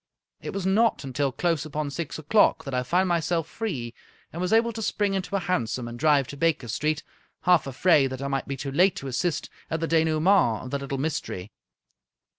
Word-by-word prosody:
It -, -, -5 dB
was 195 Hz, -2 st, -4 dB
not 215 Hz, +2 st, +2 dB
until 135 Hz, +1 st, -1 dB
close 165 Hz, +1 st, 0 dB
upon 155 Hz, -1 st, -3 dB
six 165 Hz, +1 st, -4 dB
o'clock 160 Hz, +8 st, +3 dB
that 135 Hz, -, -6 dB
I 125 Hz, -, +1 dB
found 180 Hz, +9 st, +1 dB
myself 170 Hz, -1 st, 0 dB
free, 135 Hz, -, -4 dB, 0.4 s
and 170 Hz, -, -4 dB
was 180 Hz, -, -1 dB
able 230 Hz, +1 st, +3 dB
to 225 Hz, -, -5 dB
spring 205 Hz, -1 st, 0 dB
into 190 Hz, 0 st, -2 dB
a -, -, +2 dB
hansom 125 Hz, -9 st, -1 dB
and 120 Hz, 0 st, -8 dB
drive 150 Hz, -3 st, +4 dB
to 140 Hz, -, -7 dB
Baker 160 Hz, -5 st, +1 dB
Street, 150 Hz, +7 st, -1 dB, 0.4 s
half 180 Hz, -5 st, +3 dB
afraid 135 Hz, +1 st, +3 dB
that 130 Hz, 0 st, -6 dB
I -, -, -2 dB
might 135 Hz, 0 st, -2 dB
be 140 Hz, -, -4 dB
too 135 Hz, +2 st, -4 dB
late 180 Hz, +6 st, +4 dB
to 135 Hz, -, -6 dB
assist 145 Hz, +5 st, -1 dB, 0.2 s
at 160 Hz, -, -1 dB
the 165 Hz, -, -1 dB
denoue 160 Hz, -1 st, +2 dB
ment 165 Hz, -, +3 dB
of 130 Hz, -, -8 dB
the 140 Hz, -, -1 dB
little 140 Hz, 0 st, -4 dB
mystery. 130 Hz, -, -3 dB
155 Hz, 215 wpm, -26 LUFS, 135-180 Hz, 0.4 s, drive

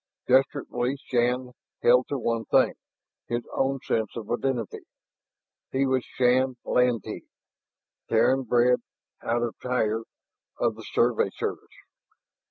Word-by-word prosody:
Desperately 130 Hz, -1 st, +1 dB
Shann 125 Hz, +1 st, 0 dB, 0.3 s
held 125 Hz, +1 st, +5 dB
to 140 Hz, -, -2 dB
one 115 Hz, -2 st, -1 dB
thing, -, -, +3 dB, 0.5 s
his 120 Hz, 0 st, -2 dB
own 135 Hz, 0 st, 0 dB
sense 110 Hz, -2 st, 0 dB
of 115 Hz, -1 st, -6 dB
identity. 120 Hz, -3 st, -1 dB, 0.9 s
He 135 Hz, +1 st, +1 dB
was 130 Hz, -1 st, +1 dB
Shann 130 Hz, +1 st, +2 dB
Lantee, 125 Hz, -4 st, 0 dB, 0.8 s
Terran 130 Hz, +4 st, +3 dB
breed, 125 Hz, 0 st, +3 dB, 0.4 s
out 120 Hz, +1 st, 0 dB
of 120 Hz, -, -2 dB
Tyr, 115 Hz, -3 st, 0 dB, 0.6 s
of -, -, +1 dB
the -, -, -11 dB
Survey -, -, +3 dB
Service. -, -, -4 dB
125 Hz, 115 wpm, -26 LUFS, 120-130 Hz, 0.9 s, held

